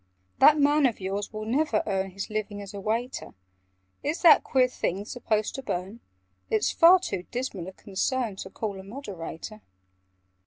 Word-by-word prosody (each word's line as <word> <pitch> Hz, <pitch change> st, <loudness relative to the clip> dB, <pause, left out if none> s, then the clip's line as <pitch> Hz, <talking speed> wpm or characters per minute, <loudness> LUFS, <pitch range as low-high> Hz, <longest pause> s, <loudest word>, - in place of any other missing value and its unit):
"That 305 Hz, -, +7 dB
man 290 Hz, 0 st, +4 dB
of 235 Hz, -, -4 dB
yours 195 Hz, +2 st, -3 dB
will 215 Hz, -1 st, -5 dB
never 295 Hz, +7 st, +1 dB
earn 195 Hz, -2 st, -1 dB
His 195 Hz, +3 st, -6 dB
living 215 Hz, -1 st, -3 dB
as 200 Hz, -1 st, -8 dB
a 200 Hz, -, -6 dB
waiter! 230 Hz, +5 st, -3 dB, 0.7 s
Is 305 Hz, +5 st, -3 dB
that 330 Hz, -3 st, +8 dB
queer 255 Hz, -1 st, +3 dB
thing 200 Hz, -5 st, -3 dB
supposed 215 Hz, -2 st, -1 dB
to 270 Hz, -, -5 dB
burn? 195 Hz, -1 st, -4 dB, 0.5 s
(It's 215 Hz, -, +2 dB
far 345 Hz, +3 st, +7 dB
too 185 Hz, -, -5 dB
dismal 240 Hz, -8 st, -4 dB
a -, -, -6 dB
concern 215 Hz, +3 st, -2 dB
To 190 Hz, -, -7 dB
call 200 Hz, -1 st, -4 dB
a -, -, -9 dB
Moderator). 205 Hz, -, -8 dB
215 Hz, 165 wpm, -27 LUFS, 195-260 Hz, 0.7 s, that